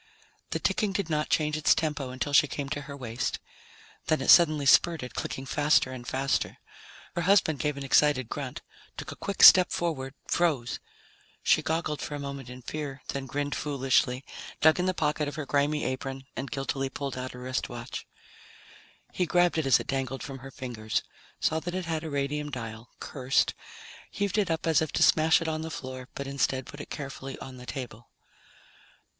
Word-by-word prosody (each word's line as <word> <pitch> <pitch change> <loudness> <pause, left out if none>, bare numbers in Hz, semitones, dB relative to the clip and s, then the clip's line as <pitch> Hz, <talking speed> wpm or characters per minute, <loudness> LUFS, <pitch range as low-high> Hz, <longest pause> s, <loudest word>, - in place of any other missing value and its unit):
The - - -1
ticking 210 -4 0
did 185 -3 -2
not 150 0 0
change 150 -1 +1
its 155 0 +4
tempo 150 -4 -2
until 130 +3 -3
she 150 - +6
came 140 0 -4
to 145 0 -3
her 140 - -6
waist. 120 -2 -3 0.7
Then 155 -1 +2
it 135 - +5
suddenly 155 -4 +6
spurted, 145 -1 +4
clicking 135 - -4
faster 145 -1 +3
and 125 -1 -8
faster. 135 +1 0 0.6
Her 175 - 0
husband 175 -5 +3
gave 150 +2 -1
an 140 - -5
excited 135 -2 +3
grunt, 135 0 -5 0.3
took - - -6
a - - -7
quick 200 - -1
step 185 -1 +10
forward, 140 -6 -2
froze. 150 -9 +1 0.6
She - - +4
goggled 160 -2 -1
for 150 - -4
a - - -5
moment 140 -3 -6
in 125 0 -10
fear, 140 -1 -5
then 135 -1 -3
grinned 145 +2 -2
foolishly, 135 -2 +1 0.3
dug 155 +3 +5
in 180 - +1
the 185 - +1
pocket 150 -1 0
of 145 - -5
her 155 - -4
grimy 145 +2 +1
apron 135 +1 -4
and 135 - -4
guiltily 135 -1 -2
pulled 140 0 -4
out 130 0 -5
a - - -9
wristwatch. 125 -2 -4 1.1
He 180 - 0
grabbed 175 0 +3
it 150 - -1
as 130 -2 +6
it - - -5
dangled 135 -1 -2
from 135 -1 -7
her 135 +2 -9
fingers, 120 -5 -3 0.4
saw 160 - +1
that 175 +3 -5
it 185 -1 -2
had 160 -1 -2
a 160 - -4
radium 145 +1 -2
dial, 115 -3 -7
cursed, 135 -1 +1 0.6
heaved 200 +1 -1
it 195 -4 +1
up 160 -1 -1
as 160 -2 +4
if 160 - -2
to - - +3
smash 160 +2 +5
it - - -4
on 155 0 -1
the 160 - -4
floor, 130 -4 -7
but 140 - -4
instead 135 -1 0
put 145 - -9
it - - -10
carefully 135 -1 -6
on 130 -1 -9
the 125 0 -11
table. 120 -4 -7
140 Hz, 190 wpm, -28 LUFS, 130-155 Hz, 1.1 s, step